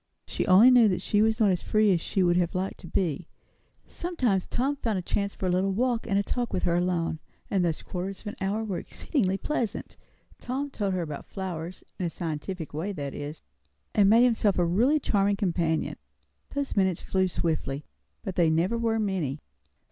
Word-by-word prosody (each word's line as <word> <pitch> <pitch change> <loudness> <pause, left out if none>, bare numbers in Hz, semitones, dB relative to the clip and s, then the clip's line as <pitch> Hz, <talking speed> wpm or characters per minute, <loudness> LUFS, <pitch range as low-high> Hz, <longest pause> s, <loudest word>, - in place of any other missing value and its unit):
She - - -3
only 205 +7 +8
knew 245 -3 +7
that 185 -3 +1
she 210 - +2
was 220 +1 +2
not 210 -3 +4
as 180 - 0
free 215 -2 +3
as 170 - 0
she 190 - 0
would 175 -1 +3
have 175 -1 +1
liked 190 +1 -2
to 175 - -10
be. 170 -2 -1 0.6
Sometimes 255 - -1
Tom 270 +4 0
found 225 -6 -1
a - - -1
chance 200 +2 -2
for - - -4
a 180 - +2
little 190 +2 +1
walk 240 +2 0
and 200 0 +1
talk 245 -2 -2
with - - -2
her 175 - +2
alone; 175 -2 0 0.3
and 190 -3 +2
those 165 -3 -1
quarters 185 +2 -5
of - - -22
an 210 - -5
hour 200 +3 0
were 200 -5 -3
exceedingly 195 - -1
pleasant; 235 -4 -3 0.4
Tom 275 +3 -3
told 200 -6 -1
her 180 - -1
about 150 -3 -7
flowers, 180 -3 -6 0.2
in 180 - 0
a - - -2
scientific 165 +1 -5
way, 165 +7 -2
that 145 -7 -5
is; 150 +2 -7 0.5
and 200 -2 +5
made 230 +3 +6
himself 225 -5 +3
a 175 - +3
really 240 - +3
charming 200 -5 +2
companion. 170 -5 0 0.5
Those 280 -1 -3
minutes 190 -4 +2
flew 190 -1 +1
swiftly. 155 -5 -2 0.4
But 190 - -4
they 170 -2 +3
never 175 +9 +1
were 225 -1 +1
many. 185 -10 -1
190 Hz, 200 wpm, -27 LUFS, 175-220 Hz, 0.6 s, only